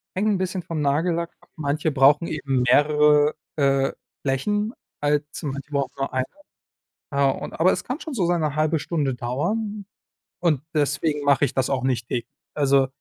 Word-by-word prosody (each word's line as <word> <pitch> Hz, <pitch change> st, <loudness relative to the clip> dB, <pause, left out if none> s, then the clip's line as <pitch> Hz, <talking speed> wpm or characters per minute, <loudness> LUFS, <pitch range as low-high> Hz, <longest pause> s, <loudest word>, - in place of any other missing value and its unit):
hängt 205 Hz, +3 st, +1 dB
'n 205 Hz, -3 st, +2 dB
bisschen 185 Hz, 0 st, -2 dB
vom 160 Hz, -2 st, -3 dB
Nagellack 165 Hz, +4 st, 0 dB
ab. -, -, -24 dB
Manche 150 Hz, 0 st, -1 dB
brauchen 145 Hz, +4 st, +5 dB
eben 135 Hz, -4 st, -1 dB
mehrere, 150 Hz, +2 st, +4 dB, 0.2 s
äh, 135 Hz, -2 st, +2 dB, 0.3 s
Flächen 205 Hz, -, 0 dB, 0.3 s
als 145 Hz, +2 st, -1 dB
manche 140 Hz, +1 st, -5 dB
brauchen 140 Hz, -2 st, -1 dB
nur 135 Hz, -1 st, -3 dB
eine. 130 Hz, 0 st, +1 dB, 0.9 s
Ja, 140 Hz, -1 st, +3 dB
und -, -, -6 dB
aber 185 Hz, +3 st, +5 dB
es -, -, -2 dB
kann 260 Hz, +6 st, -4 dB
schon 315 Hz, -, -6 dB
so 190 Hz, -8 st, +1 dB
seine 160 Hz, -4 st, 0 dB
1/2 155 Hz, +1 st, +2 dB
Stunde 145 Hz, -6 st, -1 dB
dauern 205 Hz, -, -2 dB, 0.5 s
und 160 Hz, -6 st, +2 dB
deswegen 145 Hz, 0 st, 0 dB
mache 140 Hz, 0 st, +4 dB
ich -, -, -4 dB
das 130 Hz, -1 st, 0 dB
auch 130 Hz, -1 st, 0 dB
nicht 120 Hz, -3 st, 0 dB
täglich, 120 Hz, -2 st, -3 dB, 0.3 s
also 140 Hz, -2 st, +3 dB
150 Hz, 170 wpm, -24 LUFS, 135-170 Hz, 0.9 s, brauchen